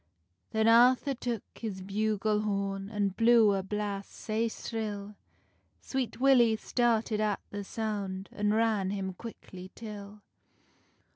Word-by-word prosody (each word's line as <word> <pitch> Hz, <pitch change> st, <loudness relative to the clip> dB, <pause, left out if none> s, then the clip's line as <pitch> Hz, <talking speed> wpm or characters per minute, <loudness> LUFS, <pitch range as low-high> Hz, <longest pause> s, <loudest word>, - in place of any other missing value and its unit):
Then 220 Hz, 0 st, +1 dB
Arthur 250 Hz, +4 st, +5 dB
took 235 Hz, -4 st, -3 dB
his 195 Hz, -5 st, -6 dB
bugle 210 Hz, +1 st, 0 dB
horn, 200 Hz, -1 st, -2 dB
An 205 Hz, -2 st, 0 dB
blew 225 Hz, +1 st, +5 dB
a 195 Hz, -, 0 dB
blast 200 Hz, 0 st, -3 dB
sae 225 Hz, +1 st, -1 dB
shrill; 210 Hz, -3 st, -5 dB, 0.7 s
Sweet 255 Hz, -4 st, -3 dB
Willy 250 Hz, -4 st, +5 dB
started 225 Hz, -2 st, +1 dB
at 210 Hz, -2 st, +1 dB
the 205 Hz, 0 st, -4 dB
sound, 200 Hz, -3 st, -4 dB
An 205 Hz, 0 st, 0 dB
ran 215 Hz, -3 st, +2 dB
him 190 Hz, -1 st, -3 dB
quickly 185 Hz, -3 st, -10 dB
till. 210 Hz, -2 st, -9 dB
210 Hz, 125 wpm, -30 LUFS, 200-230 Hz, 0.7 s, Arthur